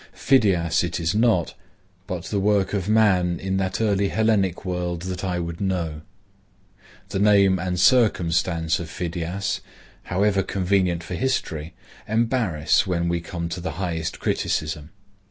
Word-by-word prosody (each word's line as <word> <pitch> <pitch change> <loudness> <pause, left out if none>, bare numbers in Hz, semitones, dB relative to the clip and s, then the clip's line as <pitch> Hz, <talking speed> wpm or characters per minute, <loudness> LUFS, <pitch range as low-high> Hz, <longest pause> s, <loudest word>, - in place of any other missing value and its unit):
Phidias 90 -11 +2
it 85 0 -2
is 85 +1 0
not, 110 -5 +2 0.5
but 90 -2 -4
the 100 - -2
work 100 -1 +1
of 100 -1 -1
man 95 -6 +3
in 95 0 -2
that 95 0 -1
early 100 -3 +2
Hellenic 105 -5 +1
world 90 -2 -3
that 90 0 -5
I 90 -2 -1
would 85 0 -5
know. 85 -6 -2 1.1
The 95 - -2
name 100 -2 +4
and 90 0 -2
circumstance 85 -8 +2
of 85 -2 -6
Phidias, 90 +4 -3 0.4
however 100 +2 +1
convenient 95 -2 0
for 85 - -7
history, 85 - -2 0.3
embarrass 110 - +1
when 85 -2 0
we 85 0 -1
come 85 -1 -5
to 90 +1 -5
the 85 -3 -4
highest 85 -2 -3
criticism. 75 -1 -2
90 Hz, 140 wpm, -23 LUFS, 85-100 Hz, 1.1 s, name